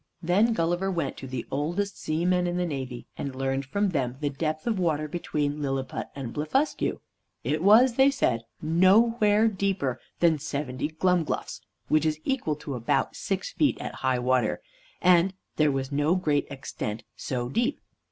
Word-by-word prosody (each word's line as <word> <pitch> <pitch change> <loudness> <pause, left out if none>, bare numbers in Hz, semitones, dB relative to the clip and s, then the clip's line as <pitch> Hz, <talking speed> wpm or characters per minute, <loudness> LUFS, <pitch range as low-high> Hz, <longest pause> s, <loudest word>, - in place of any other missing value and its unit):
Then 200 +7 +3
Gulliver 175 +1 0
went 165 -7 -2
to 135 - -7
the 130 -2 -4
oldest 175 +8 -1
seamen 180 +3 +1
in 175 0 -1
the 180 - +1
navy, 130 -6 -5
and 135 -2 -4
learned 135 +1 -1
from 200 +7 +1
them 130 -7 -1
the 145 -1 -1
depth 155 +2 -3
of 220 -5 0
water 155 -4 0
between 150 -2 -2
Lilliput 135 -2 -2
and 130 -4 -5
Blefuscu. 210 - 0 0.4
It 155 +2 0
was, 225 +7 +6
they 265 +3 +5
said, 120 - +1 0.2
nowhere 210 +6 +4
deeper 190 - -1 0.2
than 165 -3 +4
seventy 140 -1 -3
glumgluffs 170 +1 0 0.3
(which 155 +1 +3
is 155 0 -1
equal 255 - 0
to 145 -1 -6
about 120 -3 0
six - - -3
feet) - - +1
at - - -5
high 130 -1 +2
water, 125 0 +1 0.4
and 180 +1 +5 0.2
there 150 -2 +4
was 135 0 -2
no 145 +4 +2
great 155 -6 +1
extent 120 -5 -5
so 125 -2 -3
deep. 235 - 0
155 Hz, 160 wpm, -27 LUFS, 135-185 Hz, 0.4 s, was